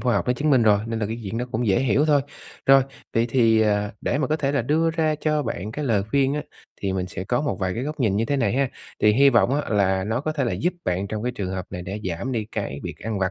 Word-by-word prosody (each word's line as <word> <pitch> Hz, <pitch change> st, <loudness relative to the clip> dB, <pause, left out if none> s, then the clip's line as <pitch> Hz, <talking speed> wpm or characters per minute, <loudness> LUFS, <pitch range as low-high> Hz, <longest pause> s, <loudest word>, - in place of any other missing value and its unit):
khoa 120 Hz, 0 st, +1 dB
học -, -, 0 dB
nó 125 Hz, -, +3 dB
chứng 145 Hz, +5 st, 0 dB
minh 130 Hz, -4 st, +5 dB
rồi, 105 Hz, -2 st, +5 dB
nên 115 Hz, 0 st, -3 dB
là 105 Hz, -, -1 dB
cái 115 Hz, +2 st, -5 dB
chuyện 100 Hz, +4 st, -3 dB
đó 125 Hz, -, -1 dB
cũng 115 Hz, +2 st, 0 dB
dễ 95 Hz, -2 st, +3 dB
hiểu 135 Hz, +3 st, +2 dB
thôi. 150 Hz, -2 st, +4 dB, 0.5 s
Rồi, 135 Hz, 0 st, +7 dB, 0.3 s
vậy 115 Hz, +1 st, +3 dB
thì, 115 Hz, -3 st, +4 dB
à, 105 Hz, -1 st, +1 dB
để -, -, 0 dB
mà 150 Hz, -, +1 dB
có 155 Hz, +4 st, 0 dB
thể 140 Hz, -2 st, -1 dB
là 140 Hz, -4 st, +1 dB
đưa 160 Hz, +6 st, +2 dB
ra 160 Hz, -1 st, +1 dB
cho 150 Hz, 0 st, 0 dB
bạn 105 Hz, -5 st, -4 dB
cái 150 Hz, +5 st, -4 dB
lời 110 Hz, -7 st, +2 dB
khuyên 140 Hz, +1 st, +2 dB
á, 150 Hz, -, -2 dB, 0.4 s
thì 95 Hz, -1 st, -1 dB
mình 95 Hz, -1 st, -2 dB
sẽ 90 Hz, +1 st, -6 dB
có 120 Hz, +6 st, 0 dB
một 145 Hz, -, -1 dB
vài 95 Hz, -1 st, -1 dB
cái 120 Hz, -, -3 dB
góc 150 Hz, +2 st, -5 dB
nhìn 105 Hz, -6 st, +2 dB
như 115 Hz, -, +1 dB
thế 140 Hz, +4 st, 0 dB
này 115 Hz, -7 st, +1 dB
ha. 135 Hz, +1 st, +1 dB, 0.3 s
Thì 105 Hz, 0 st, +5 dB
hi 140 Hz, +4 st, +5 dB
vọng, 120 Hz, +2 st, +3 dB
á, -, -, -8 dB
là 95 Hz, -3 st, +2 dB
nó 110 Hz, +4 st, -1 dB
có 155 Hz, +2 st, -2 dB
thể 145 Hz, -3 st, -1 dB
là 120 Hz, -, -1 dB
giúp 175 Hz, +3 st, 0 dB
bạn 90 Hz, +2 st, -1 dB
trong 105 Hz, +1 st, -4 dB
cái 125 Hz, +1 st, -1 dB
trường 100 Hz, -6 st, -4 dB
hợp 95 Hz, -1 st, -4 dB
này 90 Hz, -1 st, -5 dB
để 95 Hz, +4 st, -5 dB
giảm 100 Hz, +10 st, -3 dB
đi 115 Hz, -3 st, -1 dB
cái 70 Hz, -, -4 dB
việc -, -, -6 dB
ăn 110 Hz, 0 st, -3 dB
vặt 95 Hz, 0 st, 0 dB
115 Hz, 305 wpm, -23 LUFS, 100-140 Hz, 0.5 s, Rồi